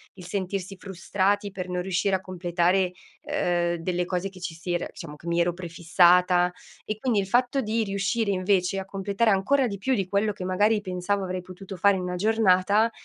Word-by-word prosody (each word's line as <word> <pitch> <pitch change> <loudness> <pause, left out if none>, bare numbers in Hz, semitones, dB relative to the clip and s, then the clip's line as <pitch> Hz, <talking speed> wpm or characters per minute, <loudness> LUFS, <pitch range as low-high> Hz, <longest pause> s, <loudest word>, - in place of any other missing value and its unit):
il 180 -2 -11
sentirsi 195 0 -3
frustrati 195 +2 -1
per 185 -1 -6
non 180 0 -1
riuscire 190 +1 0
a - - -1
completare, 180 0 0 0.3
ehm, 175 -1 0
delle 180 +1 -1
cose 180 +1 -2
che 185 -2 -14
ci 175 -2 -4
si 175 +2 -4
era 175 - -1
diciamo, 165 -5 -9
che 165 +3 -13
mi 170 0 +1
ero 170 0 +2
prefissata. 175 +1 +3 0.3
E 215 - -4
quindi, 240 -4 +1
il 195 - -2
fatto 250 +5 +2
di 225 -1 0
riuscire, 200 +2 0
invece, 185 0 +1
a 190 - -5
completare 200 +3 0
ancora 255 +8 +2
di 200 -2 -4
più 260 +7 0
di 190 -3 -2
quello 205 +1 +1
che, 190 - -7
magari, 205 +4 +2
pensavo 190 +1 -2
avrei 185 0 -3
potuto 185 +1 -10
fare 200 +2 +4
in 185 - -3
una 180 0 -3
giornata 210 +1 +3
190 Hz, 200 wpm, -26 LUFS, 180-200 Hz, 0.3 s, fare